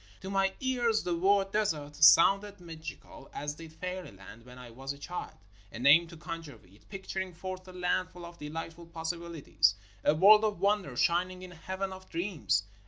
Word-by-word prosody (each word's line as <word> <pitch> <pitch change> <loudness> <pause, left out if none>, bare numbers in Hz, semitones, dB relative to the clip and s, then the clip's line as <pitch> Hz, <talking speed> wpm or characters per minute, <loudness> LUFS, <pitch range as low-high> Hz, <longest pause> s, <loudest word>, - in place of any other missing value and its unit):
To 190 - -6
my 195 0 +2
ears 240 -4 +1
the 175 -1 -1
word 195 +2 +2
"desert" 155 -9 -1
sounded 195 +6 +6
mag 165 -2 -10
ical 160 -3 -10
as 145 0 -3
did 160 +1 -11
"fairyland" 140 - -8
when 125 0 -12
I 125 -2 -11
was 135 +4 -5
a - - -13
child; 175 +5 -7 0.3
a - - -8
name 145 +7 +6
to 170 - -12
conjure 165 -5 -7
with, 100 0 -23
picturing 190 -2 -5
forth 185 +1 -7
a - - -9
land 180 0 -1
full 175 -1 -11
of 170 0 -12
delightful 165 +3 -7
possibilities, 165 - 0 0.3
a 150 - +4
world 210 +6 +7
of 210 -5 0
wonder 200 -10 0
shining 180 +2 +1
in 185 - -9
a - - -12
heaven 190 +3 -4
of 185 0 -12
dreams. 165 - 0
170 Hz, 185 wpm, -30 LUFS, 150-190 Hz, 0.3 s, world